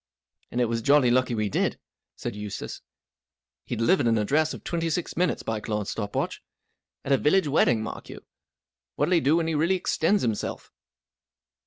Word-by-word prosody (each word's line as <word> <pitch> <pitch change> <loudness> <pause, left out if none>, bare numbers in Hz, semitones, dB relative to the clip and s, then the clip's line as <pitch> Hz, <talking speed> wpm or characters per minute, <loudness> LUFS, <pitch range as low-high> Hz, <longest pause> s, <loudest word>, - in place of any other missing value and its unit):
"And 120 - -3
it 125 - +4
was 115 0 -1
jolly 140 -1 +4
lucky 125 -1 +2
we 105 -1 0
did," 100 - 0 0.4
said - - -5
Eustace. 105 -1 -6 0.9
"He; - - -2
delivered 120 - +2
an 115 -1 +3
address 150 +9 +2
of - - -8
twenty 165 -1 -1
six, 165 +2 -2
minutes.by 155 -10 0
Claude's 105 -1 -3
stop 105 -2 -4
watch. - - -2 0.6
At 140 - -2
a 135 - +6
village 170 +3 +3
wedding, 125 -6 +3
mark 110 - -7
you! - - -10 0.7
What'll 185 - +1
He 170 - +5
do 150 +3 +3
when 170 -1 +1
he 165 - -1
really 165 +5 +2
extends 185 +2 +1
himself 110 -4 -3
130 Hz, 175 wpm, -26 LUFS, 110-165 Hz, 0.9 s, a